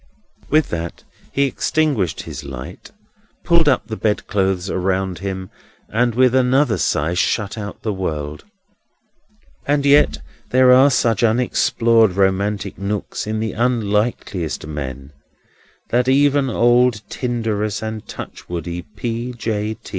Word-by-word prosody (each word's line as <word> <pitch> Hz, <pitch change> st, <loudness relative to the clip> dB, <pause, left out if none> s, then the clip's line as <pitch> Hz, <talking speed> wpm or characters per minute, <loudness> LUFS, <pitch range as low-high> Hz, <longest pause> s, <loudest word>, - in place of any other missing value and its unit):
With 155 Hz, 0 st, +3 dB
that, 85 Hz, 0 st, -5 dB, 0.3 s
he 140 Hz, -, +1 dB
extinguished 135 Hz, -, 0 dB
his 75 Hz, -, -8 dB
light, 65 Hz, -2 st, -9 dB, 0.5 s
pulled 170 Hz, -3 st, +4 dB
up 130 Hz, -, +1 dB
the 110 Hz, 0 st, -5 dB
bedclothes 95 Hz, -3 st, 0 dB
around 95 Hz, -1 st, -1 dB
him, 95 Hz, -1 st, -5 dB, 0.4 s
and 120 Hz, +1 st, +1 dB
with 125 Hz, 0 st, +4 dB
another 130 Hz, -4 st, +3 dB
sigh 80 Hz, +3 st, 0 dB
shut 100 Hz, +3 st, 0 dB
out 100 Hz, -2 st, -7 dB
the 110 Hz, -, -1 dB
world. 75 Hz, -6 st, -4 dB, 1.2 s
And 145 Hz, 0 st, +1 dB
yet 145 Hz, +1 st, +5 dB, 0.3 s
there 130 Hz, 0 st, +5 dB
are 130 Hz, +3 st, +7 dB
such 115 Hz, -5 st, +1 dB
unexplored 115 Hz, -2 st, +3 dB
romantic 100 Hz, +1 st, 0 dB
nooks 100 Hz, +1 st, -3 dB
in 110 Hz, 0 st, -2 dB
the 110 Hz, 0 st, -2 dB
unlikeliest 105 Hz, -8 st, -1 dB
men, 70 Hz, -2 st, -6 dB, 0.8 s
that 125 Hz, +1 st, +1 dB
even 140 Hz, 0 st, +3 dB
old 120 Hz, -1 st, +3 dB
tinderous 110 Hz, -4 st, -2 dB
and 110 Hz, -1 st, -4 dB
touchwoody 85 Hz, 0 st, -6 dB
P. 120 Hz, +3 st, -3 dB
J. 110 Hz, -2 st, -3 dB
110 Hz, 120 wpm, -20 LUFS, 95-125 Hz, 1.2 s, are